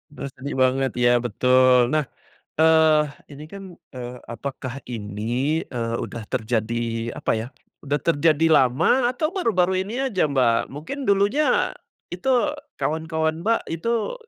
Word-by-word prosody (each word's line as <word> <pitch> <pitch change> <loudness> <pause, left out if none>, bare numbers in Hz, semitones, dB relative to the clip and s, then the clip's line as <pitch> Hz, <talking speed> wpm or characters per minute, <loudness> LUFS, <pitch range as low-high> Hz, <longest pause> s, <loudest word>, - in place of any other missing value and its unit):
Duh 140 - -5
sedih 140 +2 -6
banget 130 0 +1
iya 120 0 +4
betul. 125 +1 +3
Nah, 155 -1 +2 0.6
eee, 160 -1 +5 0.3
ini 145 +2 -10
kan, 200 0 -9 0.3
eee, 125 0 -6
apakah 130 +1 -6
ini, 120 +7 -2
eee, 115 -2 -3
udah 115 -2 -6
terjadi 115 -1 -2
apa - - -1
ya, 115 - -6 0.3
udah 145 0 -1
terjadi 160 +1 +2
lama 155 - +3
atau 310 +8 -2
baru-baru 190 - +1
ini 205 +4 -6
aja 205 -8 -1
Mbak 125 -4 +2
mungkin 150 - -7
dulunya, 205 +10 +2 0.4
itu 260 +8 +1 0.2
kawan-kawan 160 +1 -1
Mbak 225 +3 +2
itu, 230 - -1
145 Hz, 130 wpm, -23 LUFS, 125-180 Hz, 0.6 s, eee